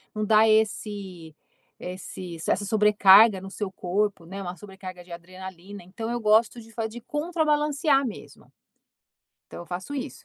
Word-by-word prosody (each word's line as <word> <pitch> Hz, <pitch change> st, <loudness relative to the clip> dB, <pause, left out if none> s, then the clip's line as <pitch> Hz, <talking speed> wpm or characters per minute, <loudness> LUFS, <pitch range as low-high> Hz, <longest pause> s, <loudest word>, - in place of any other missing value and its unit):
num 215 Hz, -, -1 dB
dar 215 Hz, +1 st, +5 dB
esse 205 Hz, -6 st, -1 dB, 0.4 s
esse 180 Hz, -1 st, -7 dB
essa -, -, +1 dB
sobrecarga 210 Hz, -1 st, +6 dB
no 195 Hz, -, -8 dB
seu 200 Hz, -1 st, -4 dB
corpo 195 Hz, 0 st, -2 dB
né, 195 Hz, +4 st, -7 dB
uma 180 Hz, -1 st, -5 dB
sobrecarga 185 Hz, -1 st, -10 dB
de 175 Hz, -, -17 dB
adrenalina, 185 Hz, +2 st, -10 dB
então 225 Hz, +6 st, -6 dB
eu 240 Hz, -, -2 dB
gosto 220 Hz, +2 st, +3 dB
de 225 Hz, +1 st, -16 dB
fa 225 Hz, 0 st, -3 dB
de 240 Hz, +2 st, -10 dB
contrabalancear 295 Hz, -1 st, +1 dB
mesmo, 220 Hz, -, -11 dB, 1.0 s
então -, -, -10 dB
eu 175 Hz, -, -10 dB
faço 185 Hz, +11 st, -6 dB
isso. 270 Hz, -1 st, -6 dB
205 Hz, 150 wpm, -25 LUFS, 185-225 Hz, 1.0 s, sobrecarga